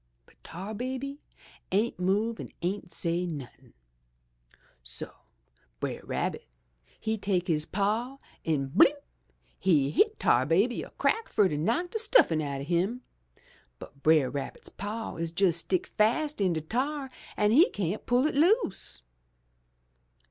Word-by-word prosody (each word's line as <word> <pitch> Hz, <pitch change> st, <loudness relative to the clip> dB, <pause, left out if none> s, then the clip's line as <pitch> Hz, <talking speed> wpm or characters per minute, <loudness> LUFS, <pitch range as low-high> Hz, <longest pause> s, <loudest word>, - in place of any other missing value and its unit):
"But -, -, -26 dB
Tar 190 Hz, +6 st, -7 dB
Baby 260 Hz, +5 st, -4 dB, 0.5 s
ain't 210 Hz, +2 st, +1 dB
move 205 Hz, +5 st, 0 dB
and -, -, -7 dB
ain't 190 Hz, +2 st, -2 dB
say 175 Hz, +1 st, -1 dB
nothin'! 145 Hz, -7 st, -9 dB, 1.1 s
So -, -, -2 dB, 0.7 s
Brer -, -, -3 dB
Rabbit -, -, -3 dB, 0.5 s
he 220 Hz, 0 st, -2 dB
take 190 Hz, -2 st, 0 dB
his 155 Hz, -3 st, +1 dB
paw 220 Hz, +7 st, -1 dB, 0.3 s
and 140 Hz, -4 st, -1 dB
blimp! 280 Hz, -, +6 dB, 0.6 s
he 145 Hz, -7 st, +3 dB
hit 430 Hz, -, +2 dB
'Tar 130 Hz, +2 st, +3 dB
Baby 200 Hz, +10 st, +2 dB
a -, -, -8 dB
crack 450 Hz, -, 0 dB
fur 205 Hz, -, +4 dB
to 150 Hz, -, -2 dB
knock 230 Hz, -, 0 dB
de 445 Hz, -, -2 dB
stuffin' 425 Hz, -, +4 dB
out 140 Hz, -2 st, -3 dB
o' -, -, -4 dB
him, 185 Hz, -, 0 dB, 0.7 s
but 140 Hz, -, -13 dB
Brer 155 Hz, -5 st, +4 dB
Rabbit's 140 Hz, 0 st, -6 dB
paw 215 Hz, +1 st, -5 dB
is 165 Hz, 0 st, -3 dB
jes' 180 Hz, -4 st, +4 dB
stick 180 Hz, +2 st, -1 dB
fast 265 Hz, +5 st, +2 dB
in 185 Hz, -3 st, +3 dB
de 160 Hz, -, -2 dB
tar 265 Hz, -, -2 dB, 0.3 s
an' 210 Hz, 0 st, +3 dB
he 310 Hz, -, +6 dB
cyan't 200 Hz, +1 st, -3 dB
pull 245 Hz, +3 st, +3 dB
it 310 Hz, -, +1 dB
loose. 310 Hz, -, +1 dB
200 Hz, 145 wpm, -28 LUFS, 165-245 Hz, 1.1 s, blimp